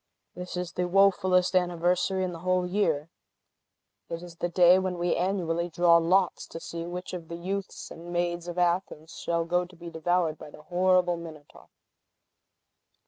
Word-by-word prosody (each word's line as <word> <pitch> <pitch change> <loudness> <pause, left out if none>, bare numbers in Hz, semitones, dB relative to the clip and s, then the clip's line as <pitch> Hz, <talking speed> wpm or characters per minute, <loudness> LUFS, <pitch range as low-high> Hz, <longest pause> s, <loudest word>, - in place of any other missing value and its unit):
This 180 0 -7
is 180 -1 -3
the 180 0 -2
wofulest 185 -1 +3
anniversary 180 +1 +1
in 185 - -2
the 170 - -8
whole 185 +1 +1
year. 165 -5 0 1.0
It 165 +1 -5
is 170 -1 -11
the 175 - -2
day 180 +1 +6
when 185 -1 -2
we 175 0 0
annually 175 -2 -1
draw 170 0 +5
lots 180 +3 +1
to 165 - -8
see 170 0 -6
which 180 +1 -6
of 170 -3 -6
the 170 - -6
youths 190 +3 -5
and 170 +1 -9
maids 175 0 -1
of 175 0 -6
Athens 175 -2 -1
shall 170 -1 -1
go 175 +1 +1
to 180 0 -13
be 170 0 -9
devoured 165 0 0
by - - -10
the 150 - -14
horrible 180 0 +2
Minotaur!" 155 -3 -12
175 Hz, 170 wpm, -27 LUFS, 170-180 Hz, 1.0 s, day